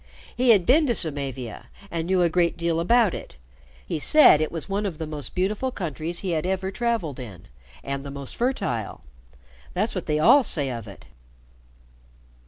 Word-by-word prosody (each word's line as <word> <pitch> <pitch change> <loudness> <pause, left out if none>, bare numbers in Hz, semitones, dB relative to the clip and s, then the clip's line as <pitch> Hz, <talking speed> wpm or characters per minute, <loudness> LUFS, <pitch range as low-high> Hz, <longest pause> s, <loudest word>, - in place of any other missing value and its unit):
He 250 0 +1
had 200 -6 +5
been 300 +4 +4
to 240 - +1
Samavia, 135 - +1 0.2
and 165 0 -3
knew 185 -1 +2
a - - +4
great 170 +1 0
deal 170 -1 -1
about 225 +3 +3
it. - - -9 0.5
He 155 - -3
said 225 - +6
it 155 - -1
was 165 -2 -5
one 200 +1 -2
of 170 -6 -6
the 160 - -4
most 150 -2 -6
beautiful 205 +8 -1
countries 170 - -4
he 190 - -3
had 160 -2 -1
ever 190 +1 -2
traveled 225 - -2
in 105 -9 -10 0.4
and 140 0 -4
the 140 - -7
most 140 -1 -7
fertile. 125 - -2 0.7
That's 210 +5 0
what 185 - -5
they 150 -1 +1
all 275 - +6
say 145 - -1
of 115 -3 -7
it." 100 - -13
170 Hz, 185 wpm, -24 LUFS, 145-205 Hz, 0.7 s, said